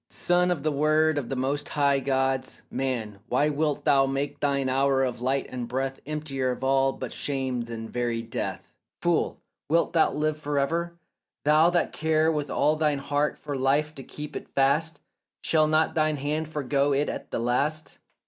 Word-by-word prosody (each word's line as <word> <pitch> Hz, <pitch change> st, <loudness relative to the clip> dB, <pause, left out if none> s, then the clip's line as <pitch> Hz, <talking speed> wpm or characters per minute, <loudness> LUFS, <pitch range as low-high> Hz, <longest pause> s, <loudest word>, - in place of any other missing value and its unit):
Son 180 Hz, 0 st, +2 dB
of 165 Hz, -6 st, -1 dB
the 155 Hz, -, +1 dB
word 155 Hz, +1 st, +2 dB
of 130 Hz, -, -6 dB
the 135 Hz, -, -2 dB
most 140 Hz, +3 st, -1 dB
high 140 Hz, -2 st, +2 dB
gods, 135 Hz, -1 st, -1 dB
man, 115 Hz, -6 st, -3 dB
Why 145 Hz, +4 st, +2 dB
wilt 150 Hz, 0 st, -1 dB
thou 135 Hz, -1 st, +4 dB
make 140 Hz, +1 st, -2 dB
thine 140 Hz, -2 st, +1 dB
hour 135 Hz, +1 st, +2 dB
of 125 Hz, -2 st, -2 dB
light 135 Hz, +2 st, 0 dB
and 125 Hz, -2 st, -5 dB
breath 135 Hz, +2 st, -2 dB
Emptier 145 Hz, -4 st, -2 dB
of 125 Hz, +1 st, -4 dB
all 135 Hz, 0 st, +3 dB
but -, -, -6 dB
shame 130 Hz, -3 st, -2 dB
than 115 Hz, -1 st, -6 dB
very 120 Hz, -1 st, -2 dB
death? 115 Hz, -, -5 dB, 0.3 s
Fool, -, -, 0 dB, 0.3 s
wilt 170 Hz, +2 st, +2 dB
thou 165 Hz, -, +4 dB
live 155 Hz, +1 st, -1 dB
for 145 Hz, -1 st, -2 dB
ever? 170 Hz, +5 st, -1 dB, 0.5 s
though 155 Hz, +3 st, +5 dB
thou 175 Hz, -1 st, +2 dB
care 160 Hz, 0 st, +1 dB
With 150 Hz, -2 st, -2 dB
all 150 Hz, +1 st, +2 dB
thine 150 Hz, -2 st, +1 dB
heart 145 Hz, +2 st, -1 dB
for 145 Hz, -1 st, -5 dB
life 140 Hz, +3 st, +1 dB
to 140 Hz, -, -8 dB
keep 150 Hz, +3 st, -8 dB
it -, -, -6 dB
fast, 150 Hz, +5 st, +2 dB, 0.4 s
Shall 155 Hz, -1 st, +3 dB
not 155 Hz, +1 st, +2 dB
thine 155 Hz, -1 st, +1 dB
hand 150 Hz, +3 st, -2 dB
forego 145 Hz, -2 st, 0 dB
it 145 Hz, +2 st, +1 dB
at -, -, -5 dB
the -, -, -2 dB
last? 140 Hz, +7 st, -1 dB
140 Hz, 185 wpm, -26 LUFS, 135-155 Hz, 0.5 s, though